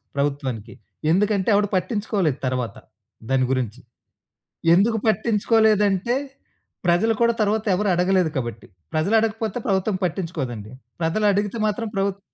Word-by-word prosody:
ప్రభుత్వానికి. 135 -6 -2 0.4
ఎందుకంటే 200 +2 +2
ఎవడు 205 0 +3
పట్టించుకోలేదు 190 - 0
తరువాత 125 -2 -2 0.5
దాని 135 -1 +2
గురించి. 125 -3 -2 1.0
ఎందుకు 220 +5 +3
పట్టించుకోలేదంటే 215 -1 +2 0.7
ప్రజలు 180 +6 +3
కూడా 235 0 +4
తర్వాత 215 +1 +1
ఎవరు 205 +3 0
అడగలేదు 180 -1 +2
కాబట్టి. 120 -4 -4 0.3
ప్రజలు 155 +8 +1
అడగకపోతే 220 0 -1
ప్రభుత్వం 190 +1 +1
పట్టించుకోదండి. 155 - -4 0.3
ప్రజలు 165 +7 0
అడిగితే 205 +3 -1
మాత్రం 215 +2 -1
ప్రభుత్ 195 0 0
190 Hz, 110 wpm, -23 LUFS, 145-215 Hz, 1.0 s, కూడా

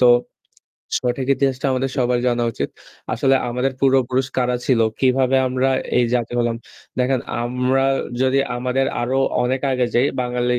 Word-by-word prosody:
তো 125 - +6 0.9
সঠিক 125 +1 -2
ইতিহাসটা 135 -1 0
আমাদের 130 +1 -1
সবার 125 -1 +1
জানা 120 -1 +1
উচিত। - - -3 0.5
আসলে 135 0 +2 0.2
আমাদের 125 +2 -1
পূর্বপুরুষ 130 -1 +2
কারা 125 -1 +1
ছিল? 125 -4 +3 0.2
কিভাবে 130 0 +3
আমরা 130 +1 +1 0.3
এই 125 - +4
জাতি 120 -1 -1
হলাম? 120 -1 0 0.4
দেখেন 125 0 +1 0.2
আমরা 125 +2 +1 0.4
যদি 130 +1 +2 0.2
আমাদের 130 +2 0 0.2
আরও 130 +3 0 0.2
অনেক 130 +2 0
আগে 125 -1 +1
যাই 125 +3 +4
বাঙালি 125 0 0
125 Hz, 145 wpm, -20 LUFS, 125-130 Hz, 0.9 s, তো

